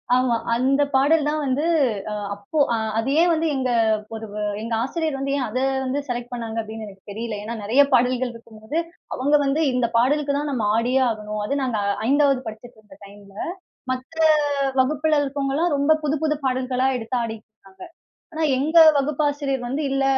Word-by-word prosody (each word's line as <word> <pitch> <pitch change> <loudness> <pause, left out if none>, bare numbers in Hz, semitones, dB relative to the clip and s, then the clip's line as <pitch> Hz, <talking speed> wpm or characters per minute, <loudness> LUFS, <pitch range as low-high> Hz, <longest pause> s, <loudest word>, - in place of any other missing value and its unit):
ஆமா. 255 -2 +2 0.2
அந்த 265 +4 +2
பாடல் 290 +3 +3
தான் 305 0 0
வந்து 275 +4 0 0.5
அ, - - -3 0.2
அப்போ 205 +10 -7 0.2
அ 230 - +1 0.2
அது 230 - -1
ஏன் 345 +1 +4
வந்து 325 0 0
எங்க 260 -1 -1 0.5
ஒரு 220 0 -6 0.4
எங்க 230 +1 -4
ஆசிரியர் 315 +1 -2
வந்து, 275 0 -2
ஏன் 265 - -1
அத 255 - -2 0.3
வந்து 265 +3 -1
செலக்ட் 245 0 -4
பண்ணாங்க 230 -2 -5
அப்படின்னு 220 0 -7
எனக்கு 195 0 -14
தெரியல? 225 +1 -4
ஏன்னா 225 +2 -5
நிறைய 235 +7 +4
பாடல்கள் 250 0 +2
இருக்கும்போது, 230 +5 -8 0.4
அவங்க 285 +4 +2
வந்து 275 +4 +1
"இந்த 250 -1 +1
பாடலுக்கு 280 +4 +2
தான் 295 0 -2
நம்ம 235 -6 -1
ஆடியே 250 +3 +2
ஆகணும்." 210 -1 -4
அது 280 - -1
நாங்க 245 -4 -1 0.3
5ஆவது 275 -1 +3
படிச்சிட்டு 220 +2 -10
இருந்த 250 +7 -17
டைம்ல, 200 0 -15 0.6
மத்த 255 +5 -7 0.6
வகுப்புல 305 +3 +1
இருக்கவங்கலாம் 285 +3 -1
ரொம்ப 285 +2 +3
புது 300 +1 +1
புது 300 -1 +1
பாடல்களா 255 0 0
எடுத்து 245 +1 -3
ஆடிட்டு 220 -1 -6
இருக்காங்க. 190 -2 -18 0.5
ஆனா 320 0 -1
எங்க 315 +5 +3 0.2
வகுப்பாசிரியர் 280 -2 -1
வந்து 275 +5 -2
இல்ல, 270 0 +1
260 Hz, 170 wpm, -22 LUFS, 230-285 Hz, 0.6 s, ஏன்